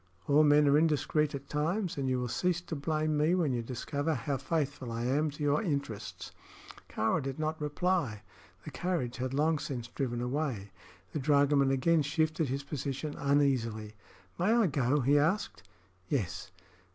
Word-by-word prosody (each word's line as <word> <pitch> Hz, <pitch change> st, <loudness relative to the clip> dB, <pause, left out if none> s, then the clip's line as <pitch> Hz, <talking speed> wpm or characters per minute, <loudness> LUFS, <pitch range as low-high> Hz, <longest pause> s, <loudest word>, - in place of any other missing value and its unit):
All 145 Hz, +1 st, +5 dB
men 150 Hz, -1 st, +5 dB
are 140 Hz, +1 st, +5 dB
indiscreet 150 Hz, -1 st, +1 dB
at 140 Hz, 0 st, -8 dB
times, 170 Hz, +7 st, -1 dB
and 135 Hz, -2 st, -1 dB
you 130 Hz, -1 st, +1 dB
will 125 Hz, -, -2 dB
cease 175 Hz, +8 st, 0 dB
to 175 Hz, -2 st, -6 dB
blame 155 Hz, +1 st, 0 dB
me 155 Hz, +4 st, +3 dB
when 160 Hz, -7 st, +1 dB
you 120 Hz, -, -1 dB
discover 140 Hz, +6 st, -2 dB
how 135 Hz, +3 st, -2 dB
faithful 140 Hz, -3 st, -2 dB
I 115 Hz, +1 st, -3 dB
am 145 Hz, +5 st, +1 dB
to 150 Hz, +1 st, -6 dB
your 145 Hz, 0 st, +2 dB
interests." 140 Hz, -, -4 dB, 0.6 s
Kāra 110 Hz, +9 st, 0 dB
did 135 Hz, -1 st, -4 dB
not 155 Hz, 0 st, -2 dB
reply. 150 Hz, -, -1 dB, 0.4 s
The -, -, -6 dB
carriage 165 Hz, -10 st, -2 dB
had 130 Hz, 0 st, -2 dB
long 150 Hz, +3 st, +2 dB
since 130 Hz, -6 st, -5 dB
driven 120 Hz, -2 st, -3 dB
away. 125 Hz, -5 st, -2 dB, 0.4 s
The 150 Hz, -, -1 dB
dragoman 140 Hz, -1 st, +3 dB
again 155 Hz, +5 st, +3 dB
shifted 155 Hz, 0 st, 0 dB
his 135 Hz, +2 st, -2 dB
position 140 Hz, +1 st, -4 dB
uneasily. 130 Hz, -7 st, +1 dB, 0.5 s
"May 185 Hz, +5 st, +3 dB
I 235 Hz, -2 st, +4 dB
go?" 140 Hz, -3 st, +1 dB
he 140 Hz, +4 st, +4 dB
asked. 170 Hz, +9 st, 0 dB, 0.5 s
"Yes." 100 Hz, -, -2 dB
145 Hz, 165 wpm, -31 LUFS, 130-155 Hz, 0.6 s, All